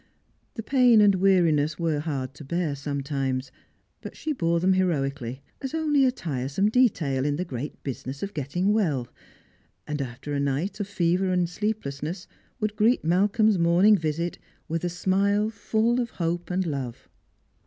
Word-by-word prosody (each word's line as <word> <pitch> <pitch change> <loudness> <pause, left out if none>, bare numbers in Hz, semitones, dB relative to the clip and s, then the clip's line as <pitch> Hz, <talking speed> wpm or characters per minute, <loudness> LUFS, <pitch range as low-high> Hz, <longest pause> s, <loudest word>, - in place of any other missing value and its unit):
The 225 - -5
pain 250 -2 +5
and 205 -1 +6
weariness 170 -6 +3
were 165 -3 0
hard 140 -4 -3
to 145 - -11
bear 165 +1 -1
sometimes, 140 -2 -3 0.5
but - - -9
she 315 -1 -2
bore 170 - +1
them 185 +2 +3
heroically, 140 -8 -1 0.2
as 270 +3 -4
only 300 -4 +3
a 255 - +3
tiresome 145 - -1
detail 175 - +2
in 145 0 0
the 180 +4 -2
great 135 -2 -6
business 135 +2 -5
of 200 - -4
getting 170 +8 0
well; 150 - 0 0.8
and 150 -1 -3
after 130 +3 -6
a 140 - 0
night 140 +9 -1
of 205 - -2
fever 185 -1 +1
and 180 -1 +2
sleeplessness, 175 -4 -4 0.3
would 215 -1 -1
greet 220 -1 +2
Malcolm's 205 +4 +3
morning 175 +5 +5
visit 165 0 -2 0.3
with 165 +1 -2
a 175 - 0
smile 200 +4 +1
full 225 +2 0
of 235 - -3
hope 170 -2 -3
and 185 +1 0
love. 135 -7 -5
170 Hz, 160 wpm, -26 LUFS, 140-205 Hz, 0.8 s, and